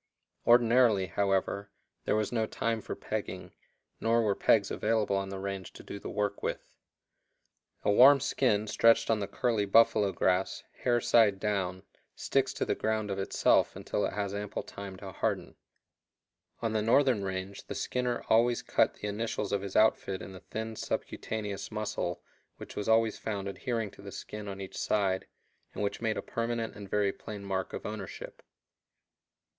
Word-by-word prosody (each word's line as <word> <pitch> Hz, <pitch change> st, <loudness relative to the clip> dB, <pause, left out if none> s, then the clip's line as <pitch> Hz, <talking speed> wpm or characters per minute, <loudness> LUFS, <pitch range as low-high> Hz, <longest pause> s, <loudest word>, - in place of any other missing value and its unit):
Ordinarily, 120 Hz, -4 st, +5 dB
however, 100 Hz, +2 st, 0 dB, 0.4 s
there -, -, +2 dB
was 110 Hz, -1 st, 0 dB
no 110 Hz, -2 st, 0 dB
time 115 Hz, 0 st, -1 dB
for -, -, -5 dB
pegging, -, -, -5 dB, 0.5 s
nor 115 Hz, +1 st, +2 dB
were 105 Hz, -2 st, +2 dB
pegs 100 Hz, 0 st, +3 dB
available 105 Hz, -2 st, +1 dB
on 95 Hz, 0 st, -1 dB
the 95 Hz, -, -5 dB
range 95 Hz, -1 st, -5 dB
to -, -, -12 dB
do 100 Hz, -, -7 dB
the -, -, -7 dB
work 105 Hz, -1 st, -2 dB
with. -, -, -4 dB, 1.1 s
A -, -, +3 dB
warm 135 Hz, +6 st, +8 dB
skin 110 Hz, -5 st, +1 dB
stretched 115 Hz, +2 st, +4 dB
on 110 Hz, -, +2 dB
the 100 Hz, -, -2 dB
curly 115 Hz, -4 st, 0 dB
buffalo 105 Hz, -1 st, +5 dB
grass, 90 Hz, +1 st, 0 dB, 0.2 s
hair 120 Hz, -1 st, +2 dB
side 105 Hz, -5 st, +4 dB
down, 95 Hz, -3 st, -1 dB, 0.3 s
sticks -, -, +1 dB
to -, -, -2 dB
the -, -, +1 dB
ground 110 Hz, -2 st, -1 dB
of 95 Hz, -, -2 dB
itself 95 Hz, -, +2 dB
until 105 Hz, -, -2 dB
it -, -, -1 dB
has 100 Hz, -1 st, -2 dB
ample 100 Hz, 0 st, -4 dB
time 100 Hz, -1 st, -8 dB
to 95 Hz, 0 st, -8 dB
harden. -, -, -2 dB, 1.1 s
On 115 Hz, -1 st, 0 dB
the 110 Hz, -, +1 dB
northern 120 Hz, -1 st, +3 dB
range 95 Hz, +1 st, -5 dB
the -, -, -5 dB
skinner 125 Hz, -1 st, -1 dB
always 120 Hz, +2 st, +3 dB
cut -, -, +2 dB
the 105 Hz, -, -5 dB
initials 105 Hz, 0 st, -2 dB
of 100 Hz, -1 st, +1 dB
his 100 Hz, -1 st, -6 dB
outfit 105 Hz, -3 st, +3 dB
in -, -, -8 dB
the 95 Hz, -, -10 dB
thin 110 Hz, +3 st, -5 dB
subcutaneous 105 Hz, -2 st, -4 dB
muscle 105 Hz, -5 st, -3 dB, 0.3 s
which -, -, -10 dB
was 105 Hz, -, -3 dB
always 110 Hz, -1 st, +3 dB
found 100 Hz, -3 st, -3 dB
adhering 110 Hz, +1 st, -3 dB
to -, -, -15 dB
the 100 Hz, 0 st, -8 dB
skin 105 Hz, +1 st, -7 dB
on 100 Hz, -1 st, -6 dB
each 95 Hz, -1 st, -6 dB
side, 95 Hz, -3 st, 0 dB, 0.5 s
and -, -, -2 dB
which 100 Hz, -, -2 dB
made 110 Hz, -2 st, 0 dB
a -, -, -3 dB
permanent 115 Hz, -1 st, -2 dB
and 100 Hz, -2 st, -9 dB
very 100 Hz, -1 st, +1 dB
plain 105 Hz, -2 st, -8 dB
mark 95 Hz, -1 st, -2 dB
of -, -, -6 dB
ownership. -, -, -7 dB
105 Hz, 170 wpm, -30 LUFS, 100-115 Hz, 1.1 s, warm